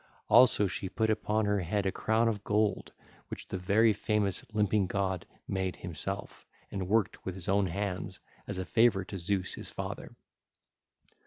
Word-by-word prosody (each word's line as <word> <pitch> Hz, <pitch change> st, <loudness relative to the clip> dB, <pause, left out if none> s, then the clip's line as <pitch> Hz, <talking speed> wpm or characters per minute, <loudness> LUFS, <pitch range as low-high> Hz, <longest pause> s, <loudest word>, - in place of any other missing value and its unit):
Also 115 Hz, -2 st, +7 dB
she 95 Hz, 0 st, -3 dB
put 110 Hz, +2 st, +1 dB
upon 110 Hz, 0 st, 0 dB
her 105 Hz, 0 st, +2 dB
head 100 Hz, +3 st, -1 dB
a 95 Hz, -, +2 dB
crown 110 Hz, +3 st, +1 dB
of 105 Hz, -3 st, -1 dB
gold 105 Hz, 0 st, 0 dB, 0.4 s
which -, -, -8 dB
the -, -, -3 dB
very 105 Hz, +4 st, +4 dB
famous 105 Hz, -1 st, 0 dB
Limping 105 Hz, -2 st, +2 dB
God 95 Hz, -2 st, -1 dB, 0.2 s
made 95 Hz, -1 st, -1 dB
himself 95 Hz, +3 st, -5 dB, 0.2 s
and 95 Hz, -2 st, -3 dB
worked 110 Hz, -1 st, +1 dB
with 95 Hz, -, -4 dB
his 95 Hz, -3 st, -5 dB
own 100 Hz, 0 st, +3 dB
hands 95 Hz, +1 st, -3 dB, 0.3 s
as -, -, -4 dB
a 95 Hz, -, -3 dB
favour 110 Hz, 0 st, +3 dB
to 95 Hz, 0 st, -6 dB
Zeus 90 Hz, +1 st, -1 dB
his -, -, -6 dB
father. -, -, -6 dB
100 Hz, 165 wpm, -30 LUFS, 95-105 Hz, 0.4 s, Also